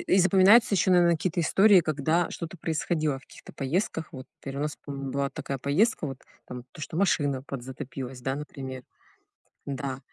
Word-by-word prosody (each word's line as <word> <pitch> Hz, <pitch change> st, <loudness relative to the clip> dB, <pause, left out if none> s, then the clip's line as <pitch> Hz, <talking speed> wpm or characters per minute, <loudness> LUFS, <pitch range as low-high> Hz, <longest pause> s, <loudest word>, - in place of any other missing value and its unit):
и 190 Hz, -, +3 dB
запоминаются 195 Hz, +4 st, +6 dB
еще, 185 Hz, 0 st, +2 dB
наверно, 175 Hz, -1 st, +5 dB
какие-то 165 Hz, +2 st, -1 dB
истории, 195 Hz, +3 st, +5 dB
когда 155 Hz, +2 st, 0 dB
что-то 170 Hz, +2 st, -6 dB
происходило 155 Hz, -3 st, -1 dB
в -, -, -19 dB
каких-то -, -, -14 dB
поездках. 160 Hz, +3 st, -2 dB
Вот 130 Hz, -1 st, -9 dB, 0.2 s
1 140 Hz, +1 st, -4 dB
раз 150 Hz, 0 st, -3 dB
помню, 140 Hz, -1 st, -5 dB
была 140 Hz, +1 st, -1 dB
такая 135 Hz, -, -5 dB
поездка, 155 Hz, -, +1 dB
вот 135 Hz, -2 st, -6 dB, 0.3 s
там 125 Hz, -1 st, -8 dB
то, -, -, -12 dB
что 155 Hz, -, -5 dB
машина 145 Hz, -8 st, +1 dB
подзатопилась, 130 Hz, -1 st, -7 dB
да, 135 Hz, +1 st, -2 dB
например. 135 Hz, -3 st, -7 dB, 0.8 s
Да. 135 Hz, -1 st, -4 dB
150 Hz, 165 wpm, -27 LUFS, 135-175 Hz, 0.8 s, запоминаются